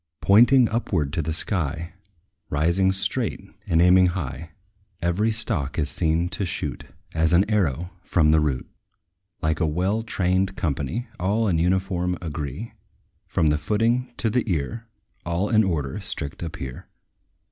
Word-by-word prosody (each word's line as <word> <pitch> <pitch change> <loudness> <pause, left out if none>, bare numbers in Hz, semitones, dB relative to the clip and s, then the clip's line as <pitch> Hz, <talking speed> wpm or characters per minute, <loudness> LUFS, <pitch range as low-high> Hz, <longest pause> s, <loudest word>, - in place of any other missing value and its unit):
Pointing 120 +5 +6
upward 90 -11 -1
to - - +1
the 80 +1 -3
sky, 85 -1 -2 0.6
Rising 85 +6 +2
straight, 110 +4 -1 0.3
and 85 -4 +2
aiming 90 +1 +6
high, 85 -2 -4 0.5
Every 90 +6 +1
stalk 95 - -1
is 75 -3 0
seen 85 +1 +1
to 100 - -3
shoot 90 - -3 0.3
As 80 +1 +2
an 95 +4 +4
arrow, 90 -5 0
from 80 -4 +3
the 80 - +5
root. 75 -4 -1 0.8
Like 80 0 +1
a 85 - +2
well 95 +8 0
trained 95 -3 0
company, 80 - -2
All 105 +5 +1
in 85 -5 +2
uniform 90 0 0
agree, 80 - -5 0.5
From 80 - +2
the 75 0 +1
footing 115 - +1
to 115 - +2
the 125 +2 +2
ear; 105 +9 -3 0.4
All 85 +4 -1
in 110 -1 +5
order 80 -4 -2
strict 80 -7 -5
appear. 80 -7 -6
90 Hz, 145 wpm, -24 LUFS, 80-105 Hz, 0.8 s, Pointing